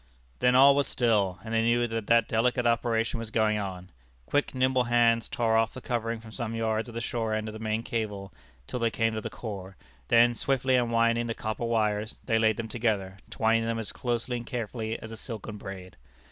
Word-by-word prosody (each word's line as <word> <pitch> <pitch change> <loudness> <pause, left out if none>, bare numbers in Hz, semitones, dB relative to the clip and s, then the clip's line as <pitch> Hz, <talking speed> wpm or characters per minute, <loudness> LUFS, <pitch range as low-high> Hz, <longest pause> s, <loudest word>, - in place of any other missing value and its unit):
Then 125 0 +4
all 140 +2 +8
was 140 0 +2
still, 105 -7 +1
and 110 0 -6
they 115 - +3
knew 120 +1 +2
that 115 -2 -4
that 115 -1 +4
delicate 120 +2 +1
operation 115 0 +1
was 115 -1 -6
going 110 -1 +1
on. 90 -2 -6 0.3
Quick, 145 - 0
nimble 130 -1 +2
hands 115 -1 +3
tore 115 -2 +1
off 115 0 +2
the - - -5
covering 115 -2 -2
from 110 0 -12
some 115 -1 -4
yards 110 0 -1
of 115 - -11
the - - -2
shore 115 -2 -1
end 110 0 -2
of 110 - -6
the 110 - -8
main 110 0 -2
cable, 105 -5 -4 0.3
till 125 - -4
they 115 -1 +2
came 115 0 0
to 110 - -3
the - - -5
core; 100 -4 -7 0.3
then, 120 +1 +5
swiftly 130 +1 +1
unwinding 115 -1 +2
the 115 - -3
copper 110 +2 -3
wires, 110 -1 0
they 115 -2 +2
laid 110 -1 +3
them 115 - -3
together, 105 -5 -1
twining 115 0 +1
them 115 0 -1
as 110 -2 -3
closely 120 -1 -2
and 120 - -8
carefully 115 -1 -3
as 110 - -9
a 115 - -7
silken 110 -2 -6
braid. 95 -2 -9
115 Hz, 215 wpm, -28 LUFS, 110-120 Hz, 0.3 s, all